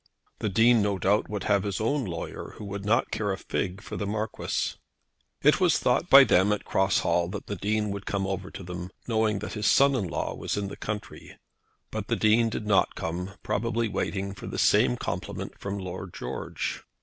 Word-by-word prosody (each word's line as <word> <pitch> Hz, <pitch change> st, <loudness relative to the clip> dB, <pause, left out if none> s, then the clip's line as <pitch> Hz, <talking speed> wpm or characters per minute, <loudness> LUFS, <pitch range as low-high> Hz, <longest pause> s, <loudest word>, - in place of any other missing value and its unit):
The 110 Hz, -, -1 dB
Dean, 115 Hz, +3 st, +5 dB
no 100 Hz, -1 st, +1 dB
doubt, 100 Hz, +4 st, +2 dB
would 105 Hz, -1 st, -3 dB
have 100 Hz, -1 st, +3 dB
his 100 Hz, -1 st, -3 dB
own 130 Hz, +4 st, 0 dB
lawyer, 85 Hz, -3 st, -6 dB
who 105 Hz, -, -8 dB
would 100 Hz, 0 st, -5 dB
not 110 Hz, +3 st, +2 dB
care 105 Hz, -1 st, -1 dB
a 95 Hz, -, -2 dB
fig 95 Hz, +2 st, -3 dB
for -, -, -6 dB
the 100 Hz, -, -2 dB
Marquis. 110 Hz, +1 st, -2 dB, 0.7 s
It -, -, +5 dB
was -, -, +4 dB
thought -, -, +1 dB
by -, -, +10 dB
them 95 Hz, +3 st, +4 dB
at 105 Hz, -, -1 dB
Cross 95 Hz, 0 st, +2 dB
Hall 85 Hz, 0 st, +1 dB
that 100 Hz, +2 st, -6 dB
the 100 Hz, -, -4 dB
Dean 105 Hz, +2 st, 0 dB
would 100 Hz, 0 st, -6 dB
come 100 Hz, -1 st, -1 dB
over 95 Hz, 0 st, -3 dB
to 95 Hz, -, -9 dB
them, 90 Hz, 0 st, -6 dB, 0.2 s
knowing 110 Hz, -3 st, +2 dB
that -, -, -6 dB
his 105 Hz, -1 st, -1 dB
son 140 Hz, 0 st, +5 dB
in 110 Hz, -8 st, 0 dB
law 80 Hz, -, -2 dB
was -, -, -3 dB
in 100 Hz, -1 st, -2 dB
the -, -, -7 dB
country; 105 Hz, -1 st, -6 dB, 0.5 s
but -, -, -4 dB
the -, -, +1 dB
Dean 115 Hz, +2 st, +4 dB
did 110 Hz, -, -4 dB
not 105 Hz, -2 st, +3 dB
come, 90 Hz, +4 st, -4 dB
probably 115 Hz, +2 st, 0 dB
waiting 100 Hz, -1 st, -2 dB
for 95 Hz, -, -9 dB
the -, -, -5 dB
same -, -, +4 dB
compliment -, -, -5 dB
from 100 Hz, 0 st, -4 dB
Lord 95 Hz, -1 st, -6 dB
George. -, -, -4 dB
100 Hz, 210 wpm, -27 LUFS, 95-110 Hz, 0.7 s, by